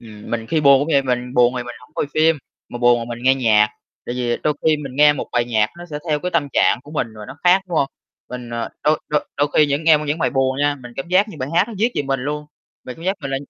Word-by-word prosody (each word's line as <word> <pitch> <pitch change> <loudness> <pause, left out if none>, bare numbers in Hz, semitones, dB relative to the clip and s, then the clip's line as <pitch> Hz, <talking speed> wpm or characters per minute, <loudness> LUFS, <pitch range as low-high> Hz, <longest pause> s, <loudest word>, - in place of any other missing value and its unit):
Ừm, 105 -3 -12
mình 115 -1 -3
khi 160 +5 0
buồn 140 -2 +6
cũng 145 - -2
vậy, 140 - +4
mình 125 -1 -2
buồn 125 0 +4
thì 125 - -2
mình 120 0 -8
hổng 125 - -20
coi - - -1
phim, 160 0 +3 0.3
mà 120 - -7
buồn 120 -1 +3
mình 120 -1 -5
nghe 130 +1 +5
nhạc. 110 -5 +3 0.4
Tại 120 - -3
vì 120 -1 -1
đôi 150 - +1
khi 155 -1 +3
mình 135 -3 -8
nghe 150 0 +6
một 145 - -5
bài 120 - +2
nhạc 110 -3 +1
nó 175 - -9
sẽ 150 -3 -6
theo 150 -1 +1
cái 180 - -3
tâm 160 -5 0
trạng - - +3
của 145 - -14
mình 150 -6 -1
và 105 - -8
nó - - -10
khác, 180 +2 +5
đúng 170 - -2
không? 140 - +3 0.4
Mình, 125 -1 -7
ờ 115 -1 -3
đôi 155 +1 +3
đôi 150 -1 0
đôi 145 +1 +1
khi 150 - +5
những 145 +2 -1
nghe 160 -2 +6
những 150 +2 -1
bài - - +1
buồn 135 -1 0
nha, 145 0 +2
mình 120 -1 -11
cảm 135 - -5
giác 190 +4 +3
như 205 - -10
bài 130 0 -3
hát 180 +5 +3
nó 230 - -7
viết 230 +4 +1
về - - 0
mình 135 -1 -2
luôn, 150 +3 -4 0.4
mình 125 - -8
cảm 165 - -11
giác 190 +2 0
mình 135 - -5
là, 135 - -1
140 Hz, 300 wpm, -20 LUFS, 120-155 Hz, 0.4 s, buồn